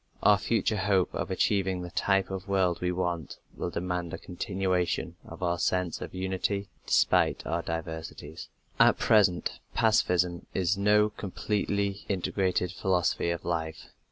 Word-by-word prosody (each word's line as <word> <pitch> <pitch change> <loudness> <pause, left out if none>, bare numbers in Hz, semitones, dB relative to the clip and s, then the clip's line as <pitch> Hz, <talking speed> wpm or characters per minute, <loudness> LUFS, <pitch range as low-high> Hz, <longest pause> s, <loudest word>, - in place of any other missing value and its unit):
Our 105 -1 +6
future 110 +1 0
hope 95 -2 +1
of - - -3
achieving 95 -1 +1
the 90 - -7
type 95 +1 +1
of 95 0 -5
world 95 -3 +1
we 90 0 0
want 90 -4 -3 0.2
will - - -3
demand 90 -1 -3
a - - -7
continuation 90 -1 -2
of - - -9
our 85 -1 0
sense 90 0 0
of - - -7
unity, 95 +2 -2 0.2
despite - - +3
our - - -1
diversities. 80 -1 -6 0.3
At - - +6
present 100 -6 +3 0.2
pacifism 90 -6 +2
is 95 +1 +2
no 105 +1 +3
completely 100 +1 -2
integrated 95 -1 0
philosophy 90 -3 0
of 85 0 -3
life. 80 -2 -3
90 Hz, 140 wpm, -28 LUFS, 85-100 Hz, 0.3 s, Our